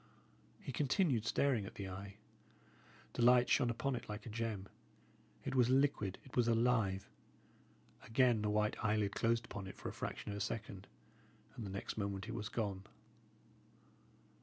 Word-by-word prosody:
He - - -6
continued 135 - +2
staring 125 -8 +2
at - - -10
the 100 - -5
eye. 95 +2 -7 1.0
The - - -2
light 125 +1 +6
shone 125 -4 +4
upon 130 +3 -1
it 120 -1 -7
like 105 0 -5
a 115 - -6
gem; 110 -3 -3 0.8
it - - -2
was 125 -2 +4
liquid, 130 -8 +2
it 135 - -12
was 120 -2 +3
alive. 115 -5 +2 0.9
Again 120 -1 +3
the 105 - 0
white 105 0 +1
eyelid 105 -2 +2
closed 115 +1 +1
upon 105 -4 -6
it 95 - -9
for - - -5
a - - -7
fraction - - -4
of 100 - -4
a - - -4
second, 100 -4 -4 0.7
and 110 - -5
the - - -5
next 100 +3 -4
moment 100 0 -2
it 115 - -4
was 110 -1 -3
gone. 100 -5 -2
110 Hz, 165 wpm, -37 LUFS, 100-120 Hz, 1.0 s, light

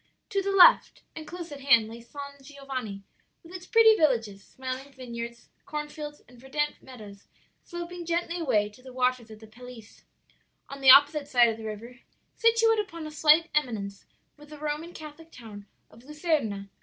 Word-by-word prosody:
"To 395 -2 0
the 395 - -3
left, 390 -2 +5
and 315 -1 -9
close 350 -1 -8
at 285 - -8
hand, 235 -6 +4
lay 230 +1 -10
San 280 +3 -10
Giovanni, 265 -8 -7 0.4
with 335 +2 -14
its 365 0 -9
pretty 450 -1 +6
villages, 230 - 0
smiling 260 +1 -7
vineyards, 235 -2 -8 0.2
cornfields 300 0 -6
and 245 -1 -18
verdant 295 +3 -3
meadows 210 -6 -13 0.4
sloping 345 0 -7
gently 340 +1 -2
away 215 -10 +1
to 210 +4 -19
the 260 0 -13
waters 250 -2 -1
of 215 -1 -12
the 220 - -13
Pelice. 235 0 -14 0.7
On 275 0 -9
the 265 - +5
opposite 285 +2 +7
side 245 -4 +4
of 220 - -4
the 220 - -9
river, 230 +3 -8 0.4
situate 455 -1 +3
upon 335 -6 -5
a 310 - -7
slight 310 +2 +3
eminence 215 -9 -3 0.3
was 295 0 -16
the 305 - -11
Roman 300 +3 -4
Catholic 315 0 -12
town 210 -4 -12 0.2
of 230 - -17
Luserna. 280 - -2
275 Hz, 170 wpm, -27 LUFS, 235-315 Hz, 0.7 s, opposite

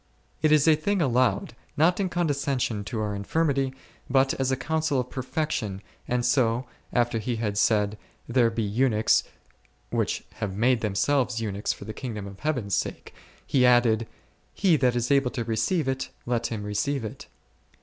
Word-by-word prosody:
It 155 - +3
is 155 0 +5
a 160 - +7
thing 195 +6 0
allowed, 125 -4 +1 0.2
not 165 +6 +3
in 190 -2 0
condescension 140 -9 -1
to 115 +1 -4
our 105 -1 -2
infirmity, 135 +6 0 0.4
but 135 +1 +3
as 135 0 -1
a 130 - +1
counsel 160 -1 0
of 125 0 -4
perfection, 130 - -3 0.2
and 125 -1 0
so, 125 -1 +2 0.3
after 120 -2 +1
He 120 +2 -2
had 110 -3 -2
said, 105 0 +2 0.3
there 120 -1 +3
be 115 0 -2
eunuchs 105 - +2 0.7
which - - -1
have 100 -3 -4
made 120 +1 +3
themselves 120 +4 +1
eunuchs 105 -2 -2
for - - -8
the 110 - -6
kingdom 110 -6 -5
of 100 0 -10
Heavens 125 -10 -2
sake, - - -2 0.3
He 130 - +2
added, 120 -3 +4 0.5
he 185 -4 +4
that 125 -4 +2
is 120 +2 0
able 140 -2 +4
to 120 -2 -3
receive 130 - 0
it, 130 0 -2 0.2
let 120 -1 0
him 110 -3 -4
receive 110 +5 -1
it. 105 - -8
125 Hz, 170 wpm, -26 LUFS, 110-140 Hz, 0.7 s, a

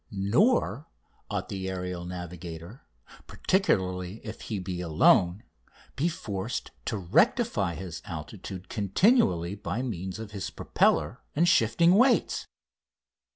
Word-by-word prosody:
Nor 120 - +2 0.4
ought - - -3
the 95 -1 -4
aerial 90 -1 -4
navigator, 90 +3 -8 0.4
particularly 95 - 0
if 110 0 -7
he 110 - -4
be 90 -1 -4
alone, 85 +3 +4 0.5
be 160 +6 +1
forced 100 - -4
to 110 - -1
rectify 105 - +2
his 90 -4 -7
altitude 90 +3 -7
continually 100 - +2
by 105 +4 -3
means 95 -6 -4
of 110 -2 -8
his 100 -2 -4
propeller - - +1
and 170 +4 +3
shifting 170 +5 +4
weights. 245 +5 +3
95 Hz, 110 wpm, -28 LUFS, 90-125 Hz, 0.5 s, alone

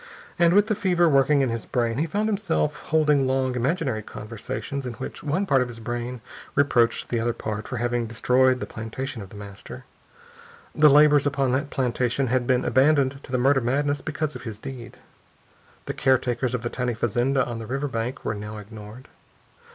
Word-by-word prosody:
And 170 +1 +5
with 205 0 +6
the 220 - 0
fever 180 -4 +2
working 140 -1 +4
in 130 - +1
his 115 -1 -4
brain 120 0 0
he 160 - 0
found 205 +6 -1
himself 195 -8 0
holding 150 -3 +3
long, 130 -1 +1
imaginary 130 -2 -1
conversations, 115 +6 -6
in 120 - -4
which 125 +3 -7
one 155 +7 -1
part 135 -8 +3
of 125 - 0
his 120 -2 -9
brain 120 +1 -4 0.3
reproached 125 -5 +2
the 120 - 0
other 120 +1 0
part 110 -1 -5
for 130 - -4
having 120 0 -1
destroyed 125 +3 +2
the - - -3
plantation 115 +3 -6
of 100 - -9
The - - -13
Master. 100 +5 -10 0.9
The 150 -1 +6
laborers 145 0 +6
upon 135 -2 +1
that 140 +3 0
plantation 125 0 0
had 125 -2 +1
been 125 -1 +2
abandoned 135 0 +3
to - - -12
the 130 - +1
murder 135 +2 +3
madness 145 +4 0
because 155 -2 -3
of 125 - -7
his 110 -4 -6
deed. 120 +1 -9 0.9
The - - -3
caretakers 125 -1 +1
of 120 - -4
the 120 - -2
tiny 125 -2 -2
fazenda 120 +4 +1
on 120 -1 -5
the 110 - -7
river 135 +4 -2
bank 125 +1 -4
were - - 0
now 105 +1 -7
ignored. 105 +3 -11
130 Hz, 190 wpm, -24 LUFS, 120-145 Hz, 0.9 s, with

